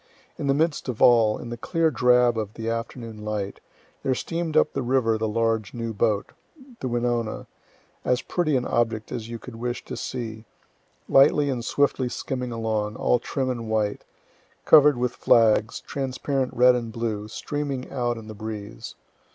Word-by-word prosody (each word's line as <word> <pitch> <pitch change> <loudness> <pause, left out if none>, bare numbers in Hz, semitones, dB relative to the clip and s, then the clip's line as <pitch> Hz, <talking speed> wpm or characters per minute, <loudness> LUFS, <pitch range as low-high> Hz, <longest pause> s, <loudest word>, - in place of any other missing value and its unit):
In 140 - -2
the 135 - +3
midst 155 -2 0
of 120 - -4
all, 115 -3 +5
in 120 - -8
the 120 - -5
clear 165 +5 +1
drab 125 -2 +4
of 110 -1 -4
the 115 0 -5
afternoon 115 -1 -5
light, 105 -2 -3 0.4
there 130 - 0
steam'd 165 +2 -2
up - - +3
the 135 - -1
river 120 -2 +2
the 110 0 -1
large, 115 -1 0
new 115 -1 -3
boat, 105 -1 0 0.5
"the 130 - -3
Wenonah," 120 -2 -1 0.6
as 125 +1 +1
pretty 155 -5 0
an 125 -1 +1
object 115 -2 0
as 115 -2 -5
you 120 - -5
could 115 0 -11
wish 120 +1 -4
to - - -6
see, 115 -3 -5 0.6
lightly 140 +1 +5
and 120 -3 -3
swiftly 135 0 +1
skimming 125 0 -4
along, 110 -2 -2
all 125 - +2
trim 130 +2 -2
and 115 -3 -5
white, 105 -2 0 0.6
cover'd 150 -3 +7
with 125 0 0
flags, 115 -1 +3
transparent 135 -1 -2
red 125 +1 +6
and 120 -2 -3
blue, 110 -2 -3
streaming 140 +3 -4
out 120 -3 -1
in 110 -1 -9
the 110 - -7
breeze. 110 0 -7
120 Hz, 170 wpm, -25 LUFS, 110-130 Hz, 0.6 s, cover'd